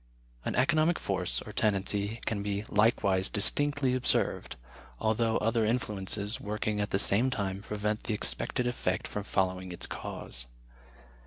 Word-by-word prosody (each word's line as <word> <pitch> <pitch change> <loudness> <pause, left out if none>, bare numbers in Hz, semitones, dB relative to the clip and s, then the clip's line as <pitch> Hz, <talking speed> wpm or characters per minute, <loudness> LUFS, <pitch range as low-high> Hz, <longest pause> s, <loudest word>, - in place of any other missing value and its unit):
An - - -2
economic 155 +6 +3
force, 90 -2 -2
or 105 - -9
tendency, 105 +1 0
can 105 -3 -1
be 100 0 -2
likewise 100 -3 +2
distinctly 145 +5 +3
observed, 130 -1 0 0.4
although 110 +1 +1
other 115 +1 +1
influences, 105 -2 -1
working 105 0 -2
at 105 - -1
the - - +1
same 105 +5 +4
time, 100 -6 -2
prevent 105 +1 -3
the 110 - -1
expected 125 +4 0
effect 120 0 -1
from 105 - -4
following 95 -2 -1
its 85 - -1
cause. - - -7
105 Hz, 140 wpm, -30 LUFS, 100-115 Hz, 0.4 s, same